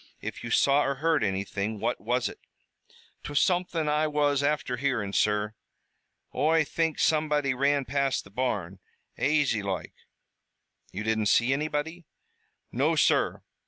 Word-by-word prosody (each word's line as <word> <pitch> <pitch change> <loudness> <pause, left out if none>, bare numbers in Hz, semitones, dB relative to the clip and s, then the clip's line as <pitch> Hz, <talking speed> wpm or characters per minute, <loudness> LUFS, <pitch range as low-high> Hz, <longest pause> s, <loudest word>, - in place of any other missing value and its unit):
If - - -7
you 120 - -5
saw 140 +5 +4
or 140 - -1
heard 155 -1 +1
anything, 100 +2 -2
what 120 +4 -2
was 120 +3 0
it?" - - -9 0.8
"'Twas 145 -1 0
something 180 -3 +1
Oi 150 +1 +1
was 145 -2 +1
afther 145 -3 -1
hearin', 120 -7 -1
sur. 105 0 +1 0.8
Oi 160 +4 +3
think 160 +2 -1
somebody 150 -3 +1
ran 140 +1 +1
past 140 +1 0
the 100 - -16
barn, 100 -6 -2 0.4
aisy 140 -6 +2
loike." 95 -2 -4 1.0
"You 100 +3 -5
didn't 110 -1 0
see 120 +5 +3
anybody?" 155 +4 -3 0.6
"No, - - +1
sur. - - +2
140 Hz, 135 wpm, -27 LUFS, 110-150 Hz, 1.0 s, saw